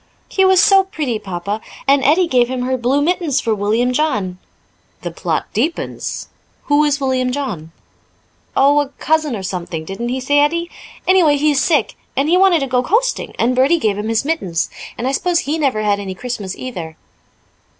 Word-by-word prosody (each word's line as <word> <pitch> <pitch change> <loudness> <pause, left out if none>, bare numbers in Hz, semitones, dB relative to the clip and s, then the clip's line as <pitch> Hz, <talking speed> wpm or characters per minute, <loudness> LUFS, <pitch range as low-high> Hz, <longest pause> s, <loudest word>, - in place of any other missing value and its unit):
"He 385 - +2
was 380 -1 +5
so 390 -1 +5
pretty, 290 - -3
Papa. 200 +3 -4 0.3
And 275 0 +4
Edie 325 +7 +4
gave 250 -6 +3
him 255 0 -3
her 260 +1 0
blue 260 +4 +1
mittens 330 -4 +1
for 225 - 0
William 220 +5 0
John." 210 -11 -1 0.6
"The - - -4
plot - - -2
deepens. 330 - -3 0.4
Who 290 +1 +3
is 295 -1 +1
William 260 -2 0
John?" 220 - -4 0.9
"Oh, 285 +2 +5
a 290 -2 -1
cousin 310 -4 0
or 195 - -6
something, 170 -4 -4
didn't 210 +7 -4
he 255 +1 -2
say 285 +3 +2
Edie? 335 +4 +1 0.4
Anyway, 350 -6 +4
he 300 +1 +2
is 275 -2 +1
sick, 300 +2 +1 0.2
and 275 +2 +2
he 345 - +4
wanted 365 -4 +4
to - - 0
go 250 -1 +1
coasting, 460 - 0
and 250 +2 +1
Bertie 270 +7 +4
gave 215 -10 0
him 210 +2 -4
his 225 +3 0
mittens. 195 - -1 0.3
And 245 - -2
I - - +1
suppose 345 +4 +1
he 305 +4 -2
never 260 -8 0
had 205 -1 +1
any 190 -2 -5
Christmas 210 -5 -5
either." 170 -11 -7
265 Hz, 190 wpm, -18 LUFS, 220-310 Hz, 0.9 s, was